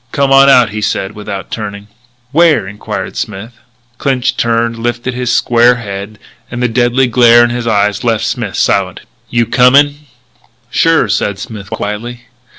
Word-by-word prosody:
"Come 140 -1 0
on 135 0 +6
out," 125 -5 +4
he 110 +1 -5
said 95 -1 -2
without 105 -3 -7
turning. 105 -2 -6 0.4
"Where?" 155 - +3
enquired 105 +2 -6
Smith. 105 +3 -6 0.5
Clinched 130 -2 -1
turned, 115 0 0
lifted 120 +2 -3
his 125 0 -2
square 120 0 +3
head; 100 -2 -7 0.3
and 120 - -6
the - - +3
deadly 120 +2 +1
glare 120 -1 +5
in 120 - +1
his 120 -1 -4
eyes 105 -2 0
left 115 -3 0
Smith - - -3
silent. - - 0 0.3
"You 120 -1 +1
comin'?" 145 +5 +3 0.6
"Sure," 165 -7 +2
said 100 -1 -1
Smith 105 -5 -9
quietly. 115 +4 -5
120 Hz, 155 wpm, -13 LUFS, 105-125 Hz, 0.6 s, on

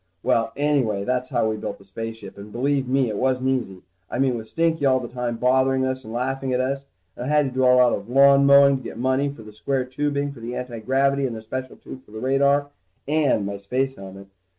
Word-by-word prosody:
Well, 115 0 +1
anyway, 135 -9 +1
that's 125 +3 -1
how 120 -3 +1
we 110 0 -2
built 100 - -5
the 100 - -19
spaceship, 110 0 -7
and 100 +1 -11
believe 135 +3 0
me, 130 0 +2
it 105 -2 -3
wasn't 130 +1 0
easy. 115 -8 -2 0.3
I - - -4
mean 130 -1 +2
with 110 -1 -7
Stinky 165 +3 0
all 130 -1 +4
the 120 - -6
time 120 -1 -4
bothering 130 +1 +2
us 130 0 -3
and 110 - -9
laughing 130 +2 -2
at 125 - +1
us. 135 +2 -2 0.3
And 125 - -6
I - - -4
had 150 0 +3
to 135 - -3
do 130 +1 0
a - - +5
lot 125 -1 +5
of 100 +3 -5
lawn 140 +1 +6
mowing 140 0 +7
to 130 - -11
get 115 - -8
money 130 +3 +1
for 140 -5 -10
the 105 0 -12
square 130 +4 -2
tubing 145 +2 -2
for 135 - -12
the 120 +2 -6
antigravity 130 +3 0
and 120 - -5
the 110 - -7
special 130 +3 -6
tube 130 - -11
for - - -24
the 110 - -6
radar, 140 +3 +2 0.4
and 145 -8 +2
my 100 0 -4
space 130 +7 -1
helmet. 95 0 -10
130 Hz, 240 wpm, -23 LUFS, 115-140 Hz, 0.4 s, mowing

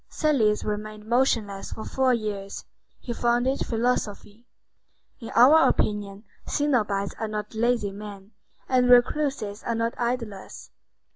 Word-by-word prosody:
Thales 240 -9 +1
remained 210 0 -5
motionless 225 -5 0
for 220 - -7
four 265 -1 +1
years. 210 -4 -3 0.4
He 240 - -4
founded 240 +3 +1
philosophy. 230 -1 -2 0.7
In 230 - -8
our 285 +7 +7
opinion, 205 -1 -2 0.2
cenobites 215 -9 0
are 220 - -2
not 210 0 -5
lazy 225 -2 0
men, 200 0 -10 0.4
and 250 -1 +2
recluses 245 -4 +2
are 230 - -2
not 230 +1 -1
idlers. 235 -5 -4
225 Hz, 120 wpm, -25 LUFS, 210-245 Hz, 0.7 s, our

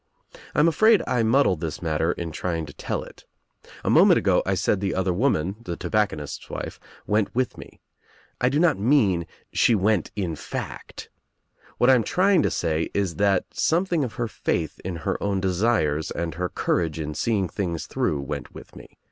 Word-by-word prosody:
I - - +2
am 150 - +5
afraid 215 +6 +4
I 125 -2 +1
muddle 115 -2 +3
this 80 -2 -5
matter 80 0 0
in 85 -2 -5
trying 85 -1 -3
to 70 - -11
tell - - -3
it. - - -14 0.6
A - - -1
moment - - +6
ago - - +3
I - - +2
said 100 - +1
the 100 -2 -1
other 95 -1 0
woman, 95 - 0
the 85 -7 -5
tobacconist's 85 -7 -2
wife, - - -6 0.3
went 105 +1 0
with 130 0 0
me. - - -13 0.6
I 125 - +4
do 140 - 0
not 165 - +3
mean 100 - +2 0.3
she 115 - +4
went 105 -2 +1
in 90 -6 -2
fact. - - -7 0.7
What 125 - +5
I - - +7
am 120 -3 +3
trying 185 - +3
to - - +1
say 80 0 -1
is 95 -4 -1
that 100 -2 +2
something 170 -1 +1
of 120 - -4
her 120 - -2
faith 80 -7 -2
in 90 -1 -4
her - - -1
own 100 -1 0
desires 90 -5 +1
and 85 -1 -3
her 90 +1 -3
courage 80 -3 -1
in 75 -1 -3
seeing 95 +5 0
things 85 -4 -3
through 70 - -1
went 70 - -6
with - - -12
me. - - -14
95 Hz, 190 wpm, -24 LUFS, 85-120 Hz, 0.7 s, I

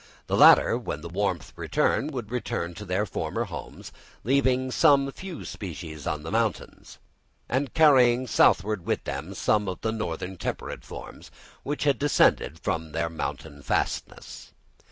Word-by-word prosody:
These - - 0
latter, - - +7
when 75 - -5
the 85 - -7
warmth 95 -2 -2
returned, 145 - 0
would 120 -6 -6
return 120 -8 -3
to 105 +4 -9
their 95 +3 0
former 95 - -3
homes, - - -8 0.3
leaving 130 0 +2
some 140 -2 +4
few 185 +2 -8
species 80 -6 -7
on 75 -2 -2
the 80 - -6
mountains, 115 0 -2 0.5
and 130 +1 -1
carrying 130 -6 +5
southward 105 -4 +3
with - - -1
them 75 +8 -5
some 105 +2 +1
of 95 - -5
the 110 - -1
northern 95 -3 -4
temperate - - -5
forms - - -10 0.3
which 145 +2 -3
had 140 -2 +2
descended 140 - +2
from 80 -1 -3
their 80 0 -1
mountain 80 -2 -5
fastnesses. - - -3
105 Hz, 150 wpm, -26 LUFS, 85-130 Hz, 0.5 s, latter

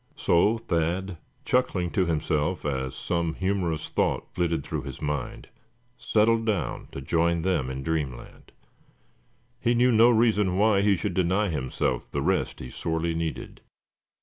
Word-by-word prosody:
So 105 +7 +3
Thad, 90 -3 -2 0.3
chuckling 95 -9 +1
to 95 -4 +1
himself 80 +1 -1
as 65 -3 -2
some 85 -2 -2
humorous 95 -5 -1
thought - - -1
flitted 85 -4 0
through 80 -1 -4
his 70 -1 -8
mind, 75 -3 -4 0.5
settled 115 +1 +2
down 105 -6 -2
to 70 - -7
join 85 +4 +1
them 85 -9 0
in 65 0 -5
dreamland. 75 -5 -4 1.1
He 120 -1 +1
knew 125 +1 +4
no 115 +1 +6
reason 110 -5 +3
why 105 -1 +4
he 100 -1 +3
should 100 +1 -3
deny 95 +3 +1
himself 65 -4 -2
the - - -2
rest - - 0
he 65 - -8
sorely 80 +1 -2
needed. 80 -1 -4
85 Hz, 145 wpm, -26 LUFS, 80-100 Hz, 1.1 s, no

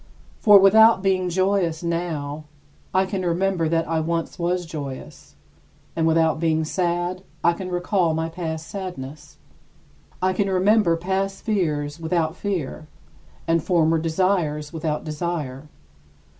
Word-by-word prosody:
For 210 -2 +8
without 210 +1 +6
being 185 -2 +1
joyous 185 -2 0
now, 155 -3 -3 0.5
I 190 +1 +2
can 190 0 -3
remember 175 -1 0
that 165 0 0
I 165 0 0
once 165 +2 -2
was 175 +1 -1
joyous, 140 - -8 0.6
and 165 -1 +1
without 160 -1 +2
being 160 -1 +1
sad, 175 +2 -1 0.2
I 170 - +4
can 185 +2 -6
recall 180 -2 0
my 160 0 -1
past 160 -2 -5
sadness. 155 -7 -7 0.8
I 185 0 +1
can 195 +1 0
remember 190 -2 +3
past 195 +3 -2
fears 150 -8 -1
without 160 0 -1
fear, 170 -6 -4 0.6
and 165 -1 +2
former 165 -3 +2
desires 160 -2 0
without 155 -2 -2
desire. 150 -3 -4
170 Hz, 130 wpm, -23 LUFS, 160-185 Hz, 0.8 s, For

